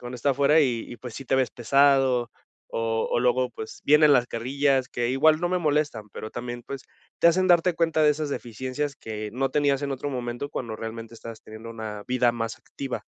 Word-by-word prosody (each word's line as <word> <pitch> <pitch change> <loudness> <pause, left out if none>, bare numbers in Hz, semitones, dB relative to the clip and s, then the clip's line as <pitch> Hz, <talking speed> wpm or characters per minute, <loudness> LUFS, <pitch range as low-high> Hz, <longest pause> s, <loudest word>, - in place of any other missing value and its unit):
cuando 125 +1 -7
está 140 +4 +1
afuera 140 +3 +4
y 120 -6 0
y 120 - -7
pues, 125 -3 -8
sí 135 - -8
te 135 - +2
ves 130 -1 +1
pesado 135 -1 +3 0.4
o 115 0 -1
o - - +1
luego 125 +1 +2
pues, 110 -2 -9
vienen 150 0 +6
las 125 -2 +3
carrillas 130 +3 0
que 120 -1 -1
igual 155 +4 +4
no 175 - 0
me 180 - +1
molestan, 150 -9 0
pero 110 - -7
también 120 0 -6
pues, 135 -1 -6 0.4
te 170 - +7
hacen 185 +2 +3
darte 175 0 +4
cuenta 165 -1 +1
de 150 - +6
esas 150 0 -2
deficiencias 130 +4 -4
que 110 -1 -6
no 135 +2 -1
tenías 145 -1 +1
en 140 -1 -2
otro 135 +2 -4
momento 120 +1 -4
cuando 115 -3 -4
realmente 115 +1 -7
estabas 115 -1 -9
teniendo 110 +1 -10
una 110 -2 -6
vida 125 -1 +3
más 115 -1 -3
activa. 135 -2 -6
130 Hz, 210 wpm, -25 LUFS, 115-145 Hz, 0.4 s, te